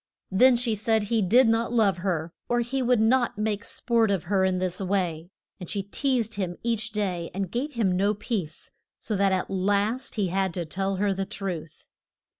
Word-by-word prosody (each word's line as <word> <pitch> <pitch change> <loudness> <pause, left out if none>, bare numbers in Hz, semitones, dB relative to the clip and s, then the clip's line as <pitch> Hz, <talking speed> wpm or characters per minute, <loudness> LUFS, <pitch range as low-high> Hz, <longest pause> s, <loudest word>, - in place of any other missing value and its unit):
Then 250 +7 +6
she 235 -1 +1
said 220 +1 +1
he 220 +2 +1
did 230 +7 +5
not 225 +1 +1
love 215 -6 +3
her 170 -3 -2 0.2
or 240 0 +2
he 260 +3 -2
would 250 -2 +3
not 240 0 +2
make 210 0 -1
sport 230 -1 +1
of 195 -4 0
her 190 +1 +1
in 190 -1 +2
this 180 -1 -1
way. 180 -4 -1 0.3
And 180 - -8
she 200 -2 -2
teased 230 +1 -1
him 185 -4 -3
each 225 -2 -1
day, 185 -5 -2
and 195 -2 -3
gave 280 +5 -2
him 205 -7 +1
no 200 +3 +2
peace, 195 -7 -4 0.3
so 215 - -3
that 195 0 +2
at 185 0 -1
last 205 +6 0
he 200 -5 0
had 190 -1 0
to 175 -2 -2
tell 195 +4 -2
her 200 +1 +1
the 195 0 -2
truth. 185 -6 -6
200 Hz, 200 wpm, -26 LUFS, 185-230 Hz, 0.3 s, Then